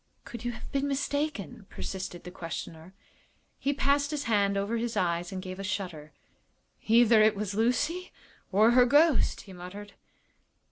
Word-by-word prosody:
"Could 235 -1 -8
you 240 - -1
have 230 - -10
been 275 0 0
mistaken?" 285 - -2
persisted 185 -2 -6
the 180 - -8
questioner. 165 0 -7 0.6
He 280 - 0
passed 280 0 +1
his 295 -1 -2
hand 200 -4 +2
over 205 +4 -1
his 230 0 -2
eyes 175 +1 0
and 185 -1 -5
gave 185 0 -7
a - - -4
shudder. 180 -6 -4 0.8
"Either 230 0 +6
it 215 0 +5
was 205 -1 -3
Lucy 270 - 0 0.4
or 215 +4 +5
her 250 0 +6
ghost," 290 +2 +3
he 195 - -13
muttered. 195 +3 -9
215 Hz, 155 wpm, -29 LUFS, 190-265 Hz, 0.8 s, Either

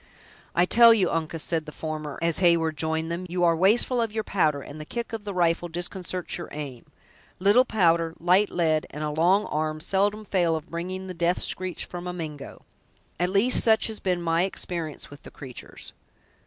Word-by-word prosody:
"I 175 - +4
tell 230 +3 +7
you, 190 -5 +1
Uncas," 165 -1 -2
said 160 -3 -1
the - - -6
former, 155 -2 -5
as 170 -1 +1
Heyward 170 -3 +3
joined 160 +2 -2
them, 180 +2 -4
"you 175 +1 -1
are 170 -1 +4
wasteful 220 +7 +3
of 225 -2 -1
your 220 0 -2
powder, 155 -9 +1
and 145 +3 -9
the - - -5
kick 235 +8 -6
of 220 -2 -5
the 205 - -3
rifle 175 -1 +1
disconcerts 180 +1 -4
your 170 - -7
aim! 140 -5 -7 0.5
Little 205 +7 +5
powder, 165 -7 +2
light 185 +4 +3
lead, 160 -3 0
and 150 - -6
a 150 - -2
long 180 +7 +3
arm, 155 0 -2
seldom 205 +5 0
fail 175 -4 +1
of 160 +2 -7
bringing 185 +3 -4
the 185 - -6
death 175 +1 0
screech 185 -1 -3
from 175 0 -7
a 180 - -4
Mingo! 155 -5 -8 0.6
At 180 +1 +1
least, 205 +6 +4
such 220 -1 +4
has 220 -2 -2
been 180 -2 -1
my 165 0 +1
experience 170 -6 -4
with 145 - -12
the - - -11
creatur's. 130 -3 -10
175 Hz, 195 wpm, -25 LUFS, 160-190 Hz, 0.6 s, tell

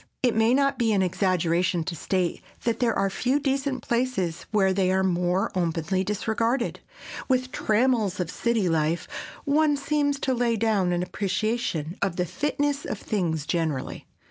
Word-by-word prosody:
It 245 -3 +4
may 225 +3 +4
not 275 -1 +2
be 225 -2 +2
an 195 -2 +3
exaggeration 180 -1 +1
to 170 +1 -4
state 180 +2 -1 0.2
that 230 -1 0
there 235 -3 +1
are 195 0 +1
few 255 +7 +1
decent 275 -1 -1
places 235 -9 -1
where 195 -3 +3
they 185 -1 +2
are 190 0 +2
more 180 0 +1
openly 175 +1 0
disregarded. 225 +5 -1 0.5
With 255 -1 +3
the - - -10
trammels 220 -5 +1
of 180 -1 -2
city 230 -5 0
life 165 0 0 0.4
one 295 0 +3
seems 285 -1 0
to 265 - +1
lay 240 -1 +1
down 210 -5 +1
an 175 0 0
appreciation 195 -3 -2
of 195 -3 0
the 180 - 0
fitness 290 - -1
of 215 - -4
things 170 -8 -2
generally. 155 -4 -2
205 Hz, 165 wpm, -26 LUFS, 180-245 Hz, 0.5 s, It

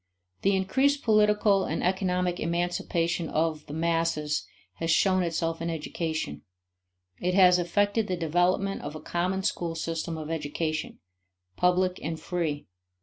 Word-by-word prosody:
The 195 0 +3
increased 270 +10 +2
political 210 -2 +4
and 160 - -2
economic 180 -1 0
emancipation 170 -1 -1
of 155 -1 -1
the 145 - -7
"masses" 165 -2 0 0.3
has 165 - -2
shown 185 +3 +4
itself 165 -1 -1
in 165 - -2
education; 160 - -3 0.8
it 180 +1 0
has 180 -2 +6
effected 205 +5 +1
the 185 - -1
development 175 +4 +1
of 150 - -6
a - - -6
common 185 +4 -1
school 170 -3 -1
system 165 0 -3
of 155 0 -5
education, 155 0 -3 0.6
public 180 - +2
and 160 +1 -4
free. 160 -5 -2
170 Hz, 135 wpm, -27 LUFS, 160-185 Hz, 0.8 s, has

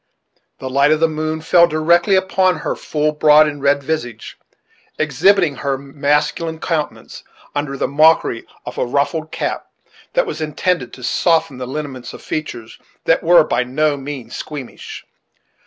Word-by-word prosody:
The 130 - -7
light 140 +3 +3
of 155 - +3
the 165 - +4
moon 155 0 -3
fell 170 +1 +5
directly 170 +4 +3
upon 190 -1 +2
her - - -3
full, 150 0 -1
broad, 150 0 +5
and 145 -1 -5
red 140 0 +2
visage, 120 -7 -4 0.6
exhibiting 160 +2 +2
her 140 -1 -1
masculine 150 +4 -1
countenance, 160 -3 -4 0.3
under 145 -1 -3
the - - 0
mockery 155 -5 +3 0.2
of 125 - -6
a - - +1
ruffled 155 +4 -1
cap - - -3 0.5
that - - +2
was 160 - -5
intended 155 -2 -1
to 125 - -11
soften 160 +1 +1
the 125 - -5
lineamints 135 -2 -6
of - - -13
features 120 -7 -6 0.3
that 165 - +3
were 170 0 +6
by 125 -4 0
no 145 +4 0
means 140 -2 -7
squeamish. 145 -5 -8
150 Hz, 155 wpm, -18 LUFS, 140-160 Hz, 0.6 s, were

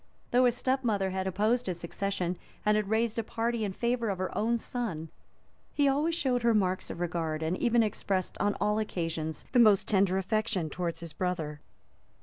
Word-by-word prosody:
Though 250 +1 +5
his 245 -1 +2
step 265 +1 0
mother 200 -5 +1
had 190 0 -2
opposed 215 +6 +1
his 180 -2 -2
succession, 180 0 -2 0.3
and 210 0 +4
had 210 -2 0
raised 225 +1 +1
a - - 0
party 230 +1 -1
in 200 - -1
favor 235 +2 0
of 195 - -1
her 185 0 -3
own 235 +2 +1
son, 215 -10 -4 0.7
he 290 -1 +4
always 295 +5 +2
showed 260 -7 +1
her 235 -1 +3
marks 185 -3 +1
of - - -6
regard, 165 -3 -2
and 160 +3 0
even 235 -1 +3
expressed, 195 -3 -1
on 205 0 +1
all 210 +1 +1
occasions, 165 -6 -3
the 250 - +4
most 215 -4 +6
tender 190 -2 +3
affection 195 -4 -1
towards 175 -2 -3
his 165 -3 -6
brother. 160 -5 -3
205 Hz, 190 wpm, -30 LUFS, 180-235 Hz, 0.7 s, most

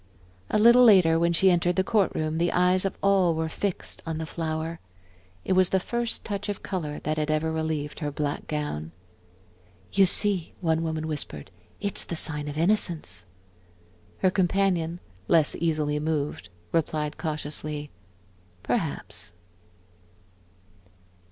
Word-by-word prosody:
A - - +1
little 235 +3 +7
later, 180 -8 +6
when 170 0 +2
she 185 +3 +4
entered 175 0 +1
the 190 - +2
court 205 -2 +2
room, 155 +1 -1
the 170 0 +2
eyes 180 +1 +3
of 195 - -2
all 190 -4 +3
were 160 0 -1
fixed 190 +4 -3
on 160 -1 -4
the 160 - -3
flower. 160 0 -4 0.7
It - - +1
was 185 -1 +4
the 190 - +2
first 235 +4 -2
touch 205 -1 -4
of 205 - -4
color 155 -6 -4
that 155 +1 -1
had 150 0 -1
ever 155 +1 0
relieved 160 -2 -3
her 150 -3 -2
black 145 0 -3
gown. 85 - -4 1.0
"You 195 -1 +5
see," 195 -2 +3
one 160 -2 +1
woman 160 -1 -3
whispered, 145 - -5 0.3
"it's 200 - 0
the 170 - -5
sign 150 -2 +1
of 145 0 -5
innocence." 165 - 0 0.9
Her 185 - +2
companion, 180 -3 +1 0.3
less 160 -3 +4
easily 155 -3 0
moved, 150 - -2 0.2
replied 155 -2 -1
cautiously: 150 -1 -4 0.7
"Perhaps." - - -2
160 Hz, 140 wpm, -26 LUFS, 155-185 Hz, 1.0 s, little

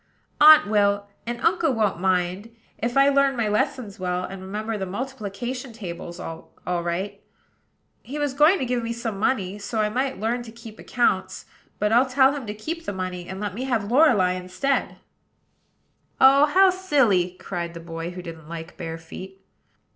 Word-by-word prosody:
"Aunt 305 +1 +9
will; 205 -1 +2 0.2
and 240 0 -3
Uncle 335 -5 +2
won't 210 -7 0
mind, 185 +3 0 0.3
if 240 +3 -1
I 275 +1 +6
learn 275 -1 +3
my 230 -2 +1
lessons 215 -1 -1
well, 180 0 -1
and 190 +1 -7
remember 210 +4 -4
the 190 -2 -3
multiplication 245 +2 -5
table 175 -6 -7 0.5
all 180 -1 -1
right. 190 +4 -3 0.8
He 280 +4 -7
was 290 -2 -1
going 305 +7 +5
to 265 - -2
give 245 0 -1
me 230 0 -2
some 225 -4 -4
money, 205 -3 0
so 220 +2 -3
I 210 0 +2
might 260 +3 -2
learn 230 +3 -1
to 235 -2 -10
keep 225 -1 -12
accounts; 215 -6 0 0.3
but 210 +1 0
I'll 250 +3 +4
tell 265 +1 +4
him 270 -6 -6
to 210 - -4
keep 330 +10 -5
the - - -3
money, 185 -1 -5
and 190 0 -6
let 205 -2 -3
me 250 +6 -4
have 230 -5 -1
Lorelei 245 - +5
instead." 185 +10 -2 1.2
"Oh, 275 +2 +7
how 375 +5 +5
silly!" 240 - +2
cried 170 -2 -5
the - - -6
boy 165 0 -6
who 180 0 -8
didn't 165 -3 -10
like 165 +1 -8
bare 165 -2 -5
feet. 190 +4 -11
215 Hz, 175 wpm, -24 LUFS, 185-260 Hz, 1.2 s, Aunt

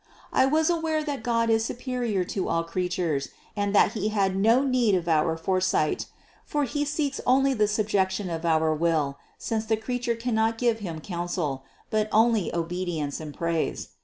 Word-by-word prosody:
754. - - +3
I - - -5
was 315 +1 +3
aware 320 -2 0
that 290 -3 -3
God 230 -1 +1
is 225 0 +3
superior 240 -5 -2
to 185 +1 -3
all 165 0 +1
crea 180 +2 -2
tures 160 -6 -1 0.3
and 205 -1 -1
that 200 - +5
He 215 -3 -2
had 195 -3 +1
no 225 +7 +4
need 250 -6 +2
of 175 -2 -2
our 160 0 +2
foresight; 185 -2 0 0.4
for 295 -1 -1
He 285 +3 -1
seeks 290 -1 -2
only 270 +2 +3
the 215 -4 +2
subjection 205 -2 0
of 165 -1 -4
our 160 -1 +2
will, 155 -3 0 0.2
since 220 -1 -2
the 220 0 +1
creature 240 +1 -2
cannot 225 -1 0
give 235 -2 +1
Him 170 -6 -5
counsel, 170 -7 -3 0.3
but 215 0 +1
only 220 -4 +3
obedience 170 -3 -2
and 155 -2 -7
praise. 165 +1 -2
205 Hz, 180 wpm, -26 LUFS, 170-235 Hz, 0.4 s, that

